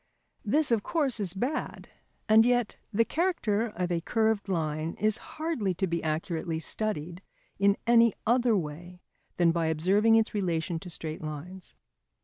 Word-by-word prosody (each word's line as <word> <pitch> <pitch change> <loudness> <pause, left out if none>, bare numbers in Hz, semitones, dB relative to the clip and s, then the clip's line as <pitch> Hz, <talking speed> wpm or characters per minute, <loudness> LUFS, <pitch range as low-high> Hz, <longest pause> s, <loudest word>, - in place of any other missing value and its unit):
This, 285 +6 +2
of 225 -3 +3
course, 275 -3 0
is 195 -2 -2
bad, 255 +10 -3 0.4
and 220 +1 +7
yet 245 -2 +1 0.2
the 230 +2 +2
character 240 - 0
of 180 -4 -3
a 170 -1 0
curved 220 +1 0
line 155 -2 -2
is 215 +2 +1 0.2
hardly 310 - -1
to 190 - 0
be 170 -2 -2
accurately 160 +1 -2
studied 175 -1 -3 0.4
in 200 0 +3
any 235 -2 +5
other 240 -1 +3
way 175 +2 -7 0.3
than 170 -1 +4
by 165 -1 0
observing 195 +8 +3
its 225 0 +2
relation 170 -4 -1
to 180 - -9
straight 160 -2 -5
lines. 160 +5 -8
195 Hz, 150 wpm, -28 LUFS, 170-225 Hz, 0.4 s, and